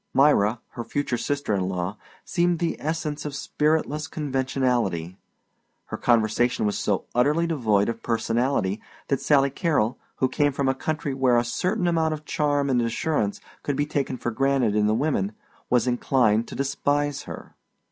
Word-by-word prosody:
Myra, 120 Hz, -5 st, +4 dB
her 120 Hz, -, -6 dB
future 125 Hz, +2 st, -2 dB
sister 140 Hz, -1 st, -1 dB
in 95 Hz, -2 st, 0 dB
law, 90 Hz, +1 st, -2 dB, 0.3 s
seemed 175 Hz, -1 st, +1 dB
the 170 Hz, 0 st, -1 dB
essence 155 Hz, -1 st, -2 dB
of 145 Hz, -2 st, -5 dB
spiritless 150 Hz, +1 st, 0 dB
conversationality. 130 Hz, -, -1 dB, 0.7 s
Her -, -, -5 dB
conversation 115 Hz, 0 st, +2 dB
was 105 Hz, -, 0 dB
so -, -, 0 dB
utterly 145 Hz, +7 st, +3 dB
devoid 110 Hz, -11 st, +1 dB
of 115 Hz, -, -3 dB
personality 115 Hz, -2 st, 0 dB, 0.3 s
that 140 Hz, -, +1 dB
Sally 140 Hz, -2 st, +3 dB
Carrol, 145 Hz, -, 0 dB, 0.2 s
who 130 Hz, -, +1 dB
came 145 Hz, +2 st, +1 dB
from 140 Hz, 0 st, 0 dB
a 130 Hz, -, +3 dB
country 150 Hz, +1 st, -3 dB
where 130 Hz, -2 st, +3 dB
a 120 Hz, -, +3 dB
certain 180 Hz, -, -1 dB
amount 160 Hz, -2 st, +1 dB
of 155 Hz, 0 st, -12 dB
charm 145 Hz, -2 st, +1 dB
and 125 Hz, -3 st, +2 dB
assurance 115 Hz, -2 st, -1 dB, 0.2 s
could 145 Hz, -, -2 dB
be 145 Hz, -, +1 dB
taken 140 Hz, -3 st, -2 dB
for 120 Hz, -, -3 dB
granted 135 Hz, -3 st, +1 dB
in 105 Hz, 0 st, +3 dB
the 110 Hz, -, +2 dB
women, 115 Hz, -7 st, 0 dB, 0.4 s
was 125 Hz, -1 st, +3 dB
inclined 120 Hz, -3 st, +2 dB
to -, -, -8 dB
despise 145 Hz, +1 st, 0 dB
her. -, -, -9 dB
135 Hz, 165 wpm, -25 LUFS, 115-150 Hz, 0.7 s, Myra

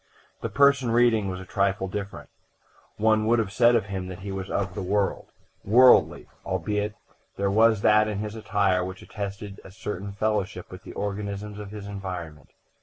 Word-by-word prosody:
The -, -, -3 dB
person 140 Hz, -3 st, +4 dB
reading 115 Hz, -3 st, +3 dB
was 90 Hz, -1 st, -4 dB
a 95 Hz, -, -9 dB
trifle 100 Hz, -1 st, 0 dB
different; 100 Hz, +1 st, -6 dB, 0.7 s
one 110 Hz, 0 st, +2 dB
would 120 Hz, +1 st, +4 dB
have 110 Hz, -4 st, -1 dB
said 120 Hz, +2 st, +4 dB
of 115 Hz, -, +1 dB
him 95 Hz, -2 st, -5 dB
that 90 Hz, 0 st, -8 dB
he 100 Hz, +1 st, -5 dB
was 95 Hz, 0 st, -5 dB
of 95 Hz, -2 st, -2 dB
the 100 Hz, -, -4 dB
world, 100 Hz, +1 st, -1 dB, 0.4 s
worldly, 125 Hz, +5 st, +5 dB, 0.2 s
albeit 105 Hz, +3 st, -2 dB, 0.4 s
there 100 Hz, 0 st, 0 dB
was 110 Hz, 0 st, +4 dB
that 105 Hz, +1 st, +5 dB
in 105 Hz, -2 st, -3 dB
his 105 Hz, +1 st, -4 dB
attire 100 Hz, -4 st, +1 dB
which 95 Hz, +1 st, -7 dB
attested 100 Hz, -1 st, -7 dB
a -, -, -12 dB
certain 100 Hz, 0 st, -6 dB
fellowship 105 Hz, -2 st, -2 dB
with -, -, -9 dB
the -, -, -10 dB
organisms 100 Hz, 0 st, -4 dB
of 105 Hz, -1 st, -7 dB
his 105 Hz, -1 st, -8 dB
environment. 90 Hz, -7 st, -7 dB
100 Hz, 180 wpm, -26 LUFS, 95-110 Hz, 0.7 s, worldly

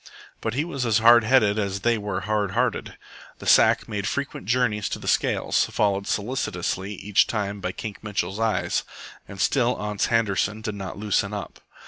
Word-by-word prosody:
But 110 Hz, +1 st, -2 dB
he 145 Hz, +4 st, 0 dB
was 140 Hz, -7 st, -3 dB
as 115 Hz, -3 st, +2 dB
hard 120 Hz, +1 st, +7 dB
headed 110 Hz, -4 st, +3 dB
as 100 Hz, -1 st, -2 dB
they 120 Hz, +2 st, +2 dB
were 100 Hz, -3 st, -3 dB
hard 105 Hz, -1 st, -1 dB
hearted. -, -, -1 dB, 0.4 s
The -, -, -11 dB
sack -, -, +5 dB
made 100 Hz, -1 st, -3 dB
frequent 140 Hz, -8 st, -4 dB
journeys 110 Hz, -4 st, +1 dB
to -, -, -3 dB
the -, -, -9 dB
scales, -, -, +1 dB
followed 100 Hz, -1 st, 0 dB
solicitously 100 Hz, -4 st, -2 dB
each 100 Hz, +1 st, +2 dB
time 105 Hz, -2 st, -3 dB
by 90 Hz, -, -2 dB
Kink 105 Hz, +2 st, -7 dB
Mitchell's 100 Hz, -2 st, -3 dB
eyes, 115 Hz, -1 st, 0 dB, 0.4 s
and 100 Hz, -, -10 dB
still 125 Hz, +5 st, +2 dB
Ans 105 Hz, -1 st, -1 dB
Handerson 110 Hz, -1 st, 0 dB
did 105 Hz, -2 st, -3 dB
not 95 Hz, -3 st, -6 dB
loosen 105 Hz, 0 st, 0 dB
up. 100 Hz, -, -6 dB
105 Hz, 175 wpm, -24 LUFS, 100-115 Hz, 0.4 s, hard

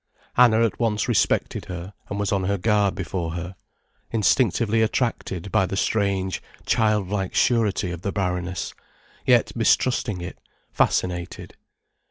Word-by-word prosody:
Anna 115 Hz, -2 st, +5 dB
at 115 Hz, -, -3 dB
once 110 Hz, -3 st, 0 dB
respected -, -, +1 dB
her, 90 Hz, +2 st, -7 dB, 0.2 s
and 100 Hz, -, -3 dB
was 100 Hz, -, -1 dB
on 95 Hz, -2 st, 0 dB
her 100 Hz, +1 st, 0 dB
guard 105 Hz, 0 st, +2 dB
before 85 Hz, -3 st, -3 dB
her, 90 Hz, +2 st, -5 dB, 0.5 s
instinctively 115 Hz, 0 st, +2 dB
attracted 110 Hz, -5 st, -1 dB
by 95 Hz, -, +3 dB
the 95 Hz, -, -3 dB
strange, 100 Hz, -3 st, 0 dB, 0.2 s
childlike 105 Hz, -3 st, 0 dB
surety 105 Hz, -6 st, +2 dB
of 85 Hz, -1 st, -6 dB
the 100 Hz, -, -2 dB
Baroness, 90 Hz, -3 st, -2 dB, 0.5 s
yet -, -, +3 dB
mistrusting 115 Hz, -6 st, +1 dB
it, 90 Hz, +1 st, -7 dB, 0.3 s
fascinated. 90 Hz, -1 st, -1 dB
100 Hz, 130 wpm, -24 LUFS, 90-110 Hz, 0.5 s, Anna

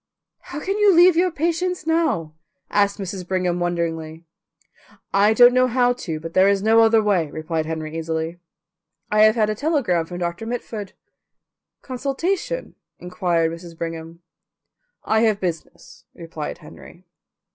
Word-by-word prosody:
"How 290 Hz, -, -8 dB
can 390 Hz, +6 st, -2 dB
you 410 Hz, -3 st, +5 dB
leave 350 Hz, +1 st, +7 dB
your 360 Hz, +2 st, +3 dB
patients 340 Hz, +2 st, -2 dB
now?" 315 Hz, -, 0 dB, 0.4 s
asked 200 Hz, -1 st, +2 dB
Mrs. 190 Hz, -2 st, -6 dB
Brigham 180 Hz, -1 st, -1 dB
wonderingly. 165 Hz, -2 st, -3 dB, 0.9 s
"I 205 Hz, +2 st, +4 dB
don't 245 Hz, +1 st, +7 dB
know 255 Hz, 0 st, +4 dB
how 245 Hz, 0 st, +2 dB
to, 165 Hz, -10 st, -5 dB
but 165 Hz, +1 st, -8 dB
there 190 Hz, +1 st, +5 dB
is 200 Hz, -1 st, +1 dB
no 225 Hz, +1 st, +5 dB
other 225 Hz, -1 st, +4 dB
way," 185 Hz, -7 st, +1 dB
replied 155 Hz, +1 st, -3 dB
Henry 160 Hz, -1 st, -5 dB
easily. 165 Hz, +1 st, -3 dB, 0.7 s
"I 210 Hz, -, +2 dB
have 215 Hz, +1 st, +6 dB
had 215 Hz, -2 st, +1 dB
a -, -, 0 dB
telegram 220 Hz, -, 0 dB
from 175 Hz, -, -7 dB
Doctor 175 Hz, +5 st, -4 dB
Mitford." 225 Hz, -4 st, -5 dB, 0.9 s
"Consultation?" 305 Hz, -, -3 dB, 0.2 s
inquired 175 Hz, -3 st, -1 dB
Mrs. 170 Hz, 0 st, -10 dB
Brigham. 165 Hz, 0 st, -7 dB, 0.8 s
"I 220 Hz, -, +1 dB
have 220 Hz, -2 st, +2 dB
business," 170 Hz, -1 st, -6 dB
replied 165 Hz, -3 st, -7 dB
Henry. -, -, -15 dB
195 Hz, 145 wpm, -22 LUFS, 165-245 Hz, 0.9 s, leave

